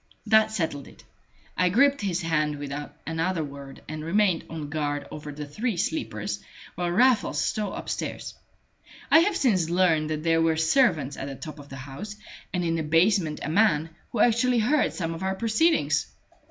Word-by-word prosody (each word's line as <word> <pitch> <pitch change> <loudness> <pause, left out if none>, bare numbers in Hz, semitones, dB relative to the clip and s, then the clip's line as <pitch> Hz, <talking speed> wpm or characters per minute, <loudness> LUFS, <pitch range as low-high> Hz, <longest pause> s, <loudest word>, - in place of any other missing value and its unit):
That 220 0 +5
settled 160 -9 -3
it. - - -16 0.5
I 180 0 +3
gripped 275 +7 +3
his 185 -3 -1
hand 150 -2 0
without 145 +1 -6
another 165 +1 -1
word, 140 -1 -10
and 155 0 -6
remained 185 0 +2
on 160 -2 -5
guard 145 -2 -2
over 150 -1 -7
the 150 +1 -6
three 210 - -3
sleepers 110 -10 -2 0.3
while 175 0 -2
Raffles 205 - +3
stole 210 +5 -1
upstairs. - - -5 0.8
I 320 - +9
have 365 +3 +2
since 190 - +2
learned 170 -4 +2
that 155 0 -3
there 165 0 +3
were 165 -1 +2
servants 160 - +2
at 135 - -5
the 135 - -6
top 155 +1 -9
of 145 0 -12
the 135 - -8
house, 140 +11 -8 0.4
and 180 -1 -1
in 165 - +1
the - - -1
basement 165 +1 +2
a - - -3
man, 165 -4 +2 0.2
who 225 - 0
actually 240 +1 +3
heard 265 +7 +2
some 165 -3 -3
of 165 - -8
our 190 0 -1
proceedings! 230 - +2
165 Hz, 180 wpm, -26 LUFS, 150-210 Hz, 0.8 s, I